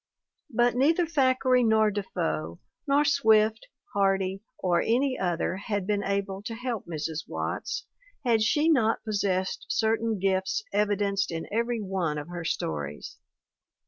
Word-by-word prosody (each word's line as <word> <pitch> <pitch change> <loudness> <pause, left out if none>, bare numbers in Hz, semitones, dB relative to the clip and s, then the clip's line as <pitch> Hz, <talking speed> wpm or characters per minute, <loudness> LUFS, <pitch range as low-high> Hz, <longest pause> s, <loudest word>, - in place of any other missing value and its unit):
But 240 +1 +2
neither 320 +7 +3
Thackeray 260 -4 +3
nor 220 -1 +4
Defoe, 85 - -3 0.3
nor 285 +1 +3
Swift, 220 -6 +3 0.3
Hardy 195 -1 +1 0.2
or 175 -2 +1
any 255 +3 +1
other 180 0 -1
had 205 -1 -3
been 205 0 0
able 195 0 -2
to 225 +2 -5
help 240 -5 -4
Mrs. 160 -1 -4
Watts - - -3 0.4
had 230 -3 +3
she 295 +8 +2
not 235 -9 +3
possessed 195 -3 -1
certain 225 0 +1
gifts 190 - 0
evidenced 205 -1 +1
in 165 -1 -4
every 235 +2 0
one 185 -6 -1
of 150 +2 -6
her 175 -1 -5
stories. 75 - -4
205 Hz, 135 wpm, -27 LUFS, 190-235 Hz, 0.4 s, nor